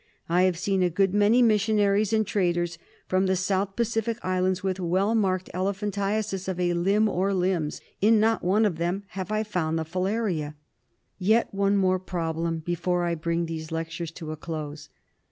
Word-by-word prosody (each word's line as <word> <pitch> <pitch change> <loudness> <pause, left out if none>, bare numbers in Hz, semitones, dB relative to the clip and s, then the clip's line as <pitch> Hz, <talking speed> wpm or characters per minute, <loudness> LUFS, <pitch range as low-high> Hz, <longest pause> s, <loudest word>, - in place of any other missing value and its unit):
I 180 +2 +3
have 175 - -4
seen 190 +2 0
a 180 - +3
good 195 +2 +1
many 210 +4 +4
missionaries 210 -1 +3
and 220 -1 +2
traders 175 -4 0 0.3
from 185 +1 +1
the 190 - +2
South 190 +1 -1
Pacific 230 -1 -1
islands 185 +1 0
with 190 -1 -1
well 190 +5 +1
marked 185 -4 0
elephantiasis 200 +1 -2
of 185 -2 -3
a 175 -1 +1
limb 200 +5 +2
or 195 0 0
limbs. 180 -4 -1 0.2
In 215 +2 +5
not 225 +1 +2
one 200 +5 +3
of 185 -6 0
them 175 +4 -1
have 190 +2 -5
I 215 0 +1
found 175 -7 -1
the 160 - -2
filaria. 180 -3 -2 0.6
Yet 220 +5 +2
one 200 0 +2
more 185 -1 +2
problem 165 -2 -2
before 175 +1 0
I 170 - 0
bring 170 +1 -1
these 160 -1 -6
lectures 165 +1 -4
to 160 -3 -7
a - - -4
close. 155 -2 -6
185 Hz, 175 wpm, -26 LUFS, 170-205 Hz, 0.6 s, In